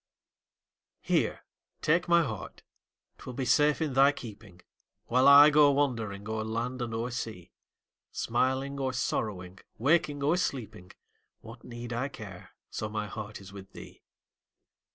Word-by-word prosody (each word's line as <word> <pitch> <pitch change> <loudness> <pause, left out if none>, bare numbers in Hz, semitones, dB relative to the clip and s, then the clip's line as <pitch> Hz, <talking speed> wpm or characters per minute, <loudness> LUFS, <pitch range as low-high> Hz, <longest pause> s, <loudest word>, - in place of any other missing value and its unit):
Here, - - 0 0.4
take 165 +3 +2
my 170 0 +5
heart 110 -9 -7 0.6
'twill 125 - -8
be 130 - -2
safe 150 +4 +3
in 150 -4 -2
thy 135 +2 +6
keeping, 105 -9 -11 0.4
While 125 +3 +3
I 145 +2 +9
go 150 -1 +6
wandering 115 -8 -1
o'er 110 0 -2
land 115 +3 -3
and 120 -1 -3
o'er 115 +2 -3
sea; 110 -7 -6 0.6
Smiling 130 +4 -1
or 130 -1 -1
sorrowing, 95 -6 -3 0.2
waking 145 +2 +1
or 155 +5 +2
sleeping, 110 - -4 0.5
What - - -12
need 120 0 -7
I 125 +4 -1
care, 100 -9 -10 0.2
so 110 - -4
my 105 0 -3
heart 105 +1 -7
is 100 0 -13
with 95 -1 -12
thee? - - -12
120 Hz, 140 wpm, -29 LUFS, 110-140 Hz, 0.6 s, I